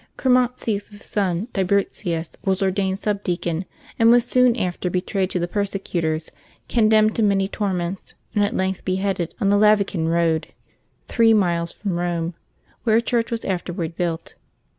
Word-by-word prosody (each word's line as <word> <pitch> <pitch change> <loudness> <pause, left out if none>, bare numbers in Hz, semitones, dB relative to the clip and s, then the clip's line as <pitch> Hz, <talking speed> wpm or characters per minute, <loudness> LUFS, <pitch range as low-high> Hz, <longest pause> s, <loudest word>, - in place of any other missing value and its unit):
Chromatius's 240 -5 0
son, 195 0 -1
Tiburtius, 185 -3 -1
was 190 0 +1
ordained 190 0 0
subdeacon, 185 -4 -2 0.3
and 225 0 +6
was 240 0 +5
soon 250 -2 +4
after 180 -4 -2
betrayed 185 +1 -1
to - - -2
the 175 0 -1
persecutors, 175 -5 -2 0.4
condemned 215 -2 +3
to - - +2
many 195 -2 +2
torments, 190 -3 -3 0.2
and 205 - +2
at 205 - -1
length 190 0 -1
beheaded 190 -2 -1
on 200 -4 +2
the 205 - +4
Lavican 200 -5 +3
Eoad, 165 -1 +1 0.6
three 225 -1 +4
miles 170 -4 +1
from 190 -5 -3
Rome, 170 -1 -1 0.5
where 220 -2 +3
a - - +5
church 235 -1 0
was 230 -1 -3
afterward 175 -3 -3
built. 170 -2 -3
195 Hz, 145 wpm, -22 LUFS, 175-215 Hz, 0.6 s, and